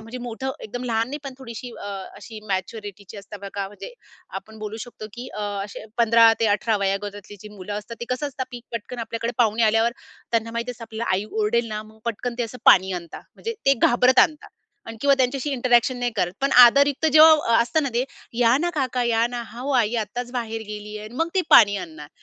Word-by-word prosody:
म्हणजे 225 +3 -8
मोठं 265 +3 -4
एकदम 245 +4 -6
लहान 230 -1 0
नाही 290 +3 -5
पण 270 -2 -6
थोडीशी 245 -1 -8
अ, - - -10
अ, 195 -2 -6
अशी 215 +1 -10
मॅच्युरिटीची 200 +1 -5
असतं 200 0 -10
बघा 200 0 -4
म्हणजे 205 - -10 0.5
आपण 220 0 -16
बोलू 215 0 -6
शकतो, 225 -3 -10
की 245 +2 -8
अ, 210 - -6 0.2
असे 205 +1 -9
15 230 -1 +6
ते 225 - +3
18 220 -1 0
वयोगटातली 205 +1 -4
जी 210 - -10
मुलं 190 +2 -7
असतात 230 +3 -9
ते 235 - -3
कसं 290 +4 -4
असतात 260 -2 -5
पि 240 -1 -8
पटकन 235 +2 -6
आपल्याकडे 230 +1 -3
पाहुणे 225 -1 +2
आल्यावर 225 +2 +3 0.4
त्यांना 230 -1 0
माहिती 235 +2 -3
असतं 235 -1 -9
आपल्याला 225 0 -4
आई 195 +2 -1
ओरडेल 225 +2 0
ना, 215 0 -4
मग 215 0 -18
पटकन 235 +1 -3
ते - - +1
असं 235 +2 -6
पाणी 190 0 +6
आणतात, 170 -2 -7
म्हणजे 460 0 -5
ते 275 - +6
घाबरत 250 +2 +4
आणतात 300 +2 +3 0.4
आणि 225 - -8
किंवा 280 -1 +4
त्यांच्याशी 265 +2 0
इंटरॅक्शन 250 -1 +2
नाही 245 0 -1
करत. 180 -2 0
पण 275 0 +1
आदरयुक्त 280 +5 +6
जेव्हा 315 +1 +9 0.2
अ, - - +4
असतं 305 +7 0
ना 280 - -1
ते, 245 +2 +1 0.3
"या 240 +1 +5
ना 345 +3 0
काका. 260 -4 -1
या 230 0 +2
ना. 240 0 -5
हां 235 +1 -10
हो, 285 - -2
आई 230 -1 +2
आत्ताच 245 +4 -6
बाहेर 225 -2 -4
गेली 210 0 -7
आहे" 210 - -8
आणि 230 - -15
मग 330 +1 0
ते 380 - +3
पाणी 205 -3 +7
आणणार. 160 -5 -8
230 Hz, 220 wpm, -23 LUFS, 210-250 Hz, 0.5 s, जेव्हा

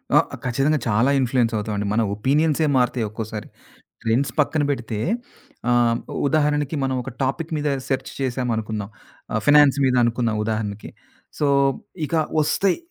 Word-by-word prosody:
ఆ! - - +8 0.3
ఖచ్చితంగా 135 +5 +1
చాలా 115 +4 +3
ఇన్‌ఫ్లుయెన్స్ 125 -2 +1
అవుతామండి. 105 -1 -2
మన 115 - +2
ఒపీనియన్సే 150 +7 +2
మారుతాయి 125 -2 +1
ఒక్కోసారి. 110 0 -6 0.6
ట్రెండ్స్ 115 +5 +1
పక్కన 150 +1 +1
పెడితే 120 -5 -3 0.7
ఆహ్, 120 -1 +3 0.3
ఉదాహరణకి, 150 0 +1
మనం 130 0 0
ఒక 135 - -7
టాపిక్ 140 +5 -2
మీద 150 0 -1 0.2
సెర్చ్ 130 -1 -2
చేశాం 130 -1 -1
అనుకుందాం. 110 -2 -3 0.4
ఆహ్, - - 0
ఫినాన్స్ 145 -1 +6
మీద 130 -1 +3
అనుకుందాం 115 -1 +1
ఉదాహరణకి. 105 -1 -3 0.5
సో 150 - +1 0.6
ఇక 165 - -5 0.3
ఒస్తాయి 180 +5 +1
125 Hz, 135 wpm, -22 LUFS, 110-145 Hz, 0.7 s, ఆ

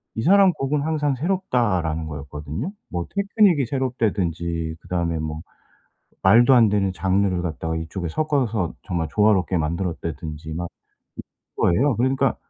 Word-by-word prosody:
"이 115 - -2
사람 195 +1 +5
곡은 145 0 -1
항상 150 -2 0
새롭다."라는 115 - 0
거였거든요. 75 - -6 0.2
뭐 85 -1 -3
테크닉이 200 - +3
새롭다든지 90 - -1
그다음에 85 -2 -2
뭐 75 0 -4 0.8
말도 120 +7 +6
안 115 -4 +6
되는 100 -2 +1
장르를 95 0 0
갖다가 80 -1 -3
이쪽에 80 +2 -4
섞어서 120 - -1
정말 85 -4 -2
조화롭게 100 -4 +3
만들었다든지 80 -2 -4
막 85 +1 -4 0.9
이런 - - +3
거예요. 135 0 +2
그러니까 130 +3 +1
95 Hz, 340 characters per minute, -23 LUFS, 80-130 Hz, 0.9 s, 말도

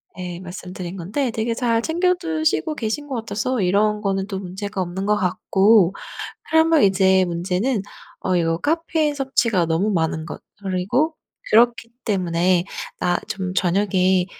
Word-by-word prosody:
네 180 -1 -6
말씀드린 180 0 -7
건데 220 +9 -2
되게 225 +1 -1
잘 230 -2 +1
챙겨드시고 325 -1 0
계신 270 +4 -3
것 270 - -4
같아서 230 +2 -2
이런 210 +3 +2
거는 195 -1 -1
또 195 -2 -4
문제가 190 +1 -5
없는 185 +2 -3
것 210 - +4
같고 190 +1 +3 0.6
그러면 320 -1 +5
이제 190 -1 +4
문제는 180 +7 -1 0.4
어 185 - 0
이거 165 -1 +1
카페인 315 - 0
섭취가 235 -9 +1
너무 170 +6 +1
많은 160 -3 -1
것 - - -8 0.2
그리고 200 - 0 0.3
그렇기 230 0 +4 0.2
때문에 180 -3 +1 0.3
나 175 0 +1
좀 185 -2 -3
저녁에 185 0 +2
195 Hz, 290 characters per minute, -22 LUFS, 180-240 Hz, 0.6 s, 그러면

